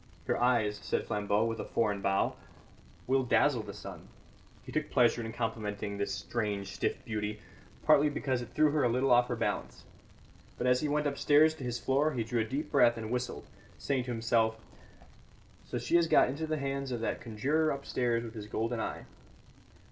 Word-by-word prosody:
"Your - - +1
eyes," 110 -4 +2
said - - -1
Flambeau, 105 +1 +1
with 115 0 -2
a - - -2
foreign 105 -3 0
bow, 100 0 +1 0.7
"will 135 +1 +2
dazzle 130 0 +3
the 105 -1 -8
sun." - - -9 0.6
He - - -10
took - - -2
pleasure 120 -1 +3
in 110 - -5
complimenting 105 -3 -3
this 100 - -1
strange 100 -1 -3
stiff - - -2
beauty, 105 -1 -3 0.5
partly 150 -1 +5
because 130 -3 -1
it 120 - -7
threw 155 -1 +4
her 150 -1 +1
a 120 - +3
little 130 +3 +1
off 120 0 +5
her - - -2
balance. - - -3 0.7
But 120 - -2
as 125 0 +3
he 155 - 0
went 150 +1 +1
upstairs 145 +2 +4
to 155 - -9
his 120 -1 -2
floor 145 +5 +1
he 120 -3 -1
drew 115 +1 -1
a - - -1
deep 135 +7 -4
breath 120 -5 +5
and 110 0 -5
whistled, 125 0 -3 0.3
saying 130 -3 -1
to 125 - -4
himself: 115 -1 +1 1.1
"So - - -4
she 170 - +2
has 170 -1 +3
got - - +5
into 155 +5 -3
the 155 0 -1
hands 140 -1 -3
of 120 -2 -3
that - - -2
conjurer 135 +8 0
upstairs 125 -4 -1
with 115 -1 -8
his 105 -3 -7
golden 115 +2 -2
eye." - - -4
120 Hz, 195 wpm, -31 LUFS, 110-140 Hz, 1.1 s, partly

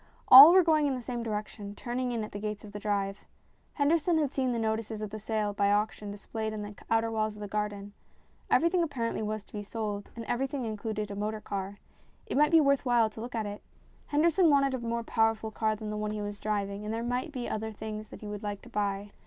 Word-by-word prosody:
All 275 +5 +13
were 370 +1 +7
going 310 -3 +3
in 270 - 0
the 250 - -5
same 240 +1 -4
direction, 210 -2 -5
turning 245 +2 -3
in 230 -2 -2
at 215 - -7
the 205 - -6
gates 210 0 -4
of 210 - -10
the 205 - -6
drive. 200 -1 -2 0.5
Henderson 320 +3 +2
had 295 -4 +1
seen 260 -3 0
the 235 - -1
notices 220 -1 -2
of 215 -1 -5
the 215 - -6
sale 215 -1 -1
by 200 0 +2
auction 210 0 0
dis 200 0 -9
played 220 -1 -3
on 210 - -4
the 205 0 -7 0.2
outer 225 0 +2
walls 215 -1 -1
of - - -12
the 205 - -5
garden. 205 -1 -3 0.6
Every 335 - +4
thing 355 +1 +2
apparently 260 -10 -2
was 215 -1 -3
to - - -27
be 210 - -4
sold, 205 -1 -4
and 230 -1 -6
everything 265 +2 -2
included 215 -1 -4
a - - -5
motor 215 +2 -2
car. 200 -1 -5 0.5
It - - -4
might 300 +2 +5
be 330 - +7
worth 280 -2 +3
while 240 -4 +3
to 220 - -9
look 240 +1 -6
at 220 -2 -1
it. 205 0 -6 0.5
Henderson 330 +3 +3
wanted 275 -2 +3
a 260 - -2
more 235 0 -2
powerful 225 -1 +1
car 215 0 0
than 215 0 -6
the 210 - -3
one 210 0 -2
he 210 0 -3
was 205 0 -5
driving, 205 -1 -2
and 210 - -4
there 225 +1 -2
might 250 +6 -2
be 250 -4 -4
other 220 +1 -3
things 215 0 -7
that - - -11
he 210 - -7
would 205 0 -5
like 205 -1 -5
to - - -12
buy. 205 0 -2
220 Hz, 250 wpm, -29 LUFS, 210-245 Hz, 0.6 s, All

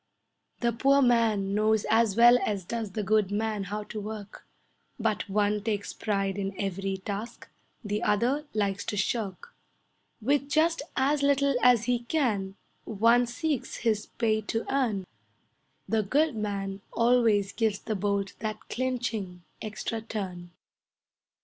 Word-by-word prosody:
The 235 -1 +2
poor 275 +4 +4
man 220 -5 +2
knows 215 +1 +2
as 225 -3 +3
well 240 +1 +8
as 200 -4 -2
does 220 -1 -4
the 215 - -2
good 210 -1 +2
man 210 -1 -1
how 210 +2 -4
to 210 0 -6
work, 210 -1 -8 0.5
But 215 -2 -1
one 210 +1 +1
takes 210 -2 -2
pride 195 -2 -1
in 195 -1 -4
every 195 0 -2
task, 205 +4 -6 0.4
the 210 0 -2
other 250 +9 +1
likes 200 -2 0
to 205 - -3
shirk; 215 - -2 0.7
With 280 +4 +1
just 325 +2 +2
as 280 +2 +2
little 280 0 +3
as 245 -3 +5
he 245 0 +1
can, 230 -7 -1 0.3
one 230 +3 +3
seeks 285 +2 -2
his 215 -3 0
pay 220 -2 0
to 225 +2 -3
earn, 225 -9 0 0.8
The 220 -1 +2
good 285 +7 +1
man 200 -2 -3
always 230 -4 +3
gives 220 -2 0
the 220 - -4
bolt 200 -1 -1
that 215 0 -5
clinching, 235 -8 -3 0.2
extra 220 +1 -4
turn. 185 -6 -5
215 Hz, 140 wpm, -28 LUFS, 200-240 Hz, 0.8 s, well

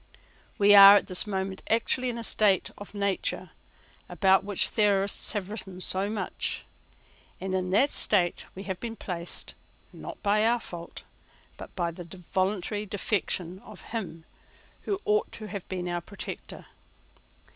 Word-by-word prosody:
We 205 0 +6
are 200 0 +11
at 205 - +3
this 185 +2 +2
moment 190 -1 -3
actually 245 +3 +1
in 240 - -3
that 230 -1 -5
state 205 -4 +2
of 205 +1 -11
nature 200 -1 -2 0.6
about 190 -1 +3
which 200 -1 +1
theorists 200 -1 +2
have 205 -2 -3
written 190 -4 -8
so 190 +2 0
much; 210 -3 -3 0.7
and 190 0 -4
in 185 -1 -1
that 240 +10 +3
state 180 -5 +1
we 190 - -7
have 190 -2 -5
been 230 -1 -5
placed, 175 -5 -4 0.4
not - - -9
by 210 +1 +3
our 235 +2 +3
fault, 170 -5 -9 0.5
but - - -11
by 170 -2 -1
the 170 +1 -10 0.2
voluntary 205 +2 -1
defection 185 -3 -2
of 210 0 -13
him 175 -8 -5 0.6
who 395 -2 -1
ought 425 0 +1
to 215 -2 -7
have 200 -3 -7
been 180 -1 -3
our 175 0 -2
protector. 200 +4 -8
195 Hz, 150 wpm, -27 LUFS, 185-210 Hz, 0.7 s, are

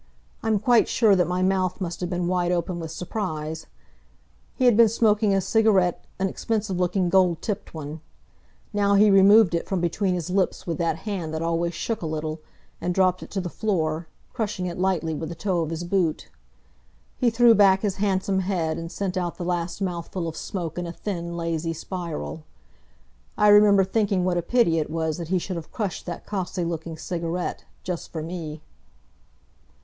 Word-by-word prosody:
I'm 220 -1 +1
quite 235 +3 +4
sure 220 -4 +4
that 180 -2 +2
my 180 +1 0
mouth 185 -1 +1
must 175 -2 -4
have 175 - -2
been 180 -1 -1
wide 175 0 +1
open 175 0 -1
with 165 -1 -5
surprise. 160 -3 -4 0.9
He 255 - +1
had 245 -3 +6
been 230 0 +6
smoking 215 -1 +2
a 195 - +3
cigarette 195 -3 +2
an 190 - 0
expensive 205 -1 -2
looking, 180 +1 +1
gold 180 -3 +3
tipped 205 -5 -4
one. 155 0 -6 0.7
Now 200 -1 +3
he 205 +1 +6
removed 195 0 +6
it 170 - -1
from 190 -2 -1
between 180 +2 0
his 175 0 -4
lips 190 0 0
with 170 0 -3
that 170 -1 +1
hand 175 -7 -3
that 160 - -2
always 170 0 -1
shook 225 +3 -3
a 165 - -3
little, 155 0 -4 0.4
and 180 0 -1
dropped 185 -1 +3
it - - -9
to 195 - -2
the 180 - -4
floor, 165 -5 -1 0.3
crushing 210 -5 -2
it 175 0 -4
lightly 180 -4 0
with 155 +1 -4
the 170 - -6
toe 180 -1 -1
of 160 - -2
his 165 +1 -4
boot. 175 -3 0 0.9
He 245 - +3
threw 235 +1 +6
back 195 -3 +5
his 200 -3 -1
handsome 195 -1 +1
head 180 -4 -1
and 165 0 -6
sent 195 -2 -3
out 175 -2 -2
the 175 - -4
last 175 +2 -2
mouthful 175 -1 -3
of 160 - -5
smoke 175 -2 -4
in 175 - -3
a - - -4
thin, 170 -2 -5
lazy 165 -1 -2
spiral. 165 -2 -5 0.9
I 210 -1 +5
remember 205 -1 +7
thinking 195 -2 +1
what 180 -1 +1
a - - 0
pity 170 -4 +2
it 150 - -2
was 160 0 -2
that 170 - -5
he 185 +2 +1
should 180 0 -4
have 160 - -8
crushed 205 -5 -4
that 175 - -6
costly 185 -3 -3
looking 165 -1 -4
cigarette, 170 +1 -3 0.2
just 180 -2 -5
for 160 -2 -4
me. 160 -2 -6
180 Hz, 190 wpm, -24 LUFS, 165-195 Hz, 0.9 s, remember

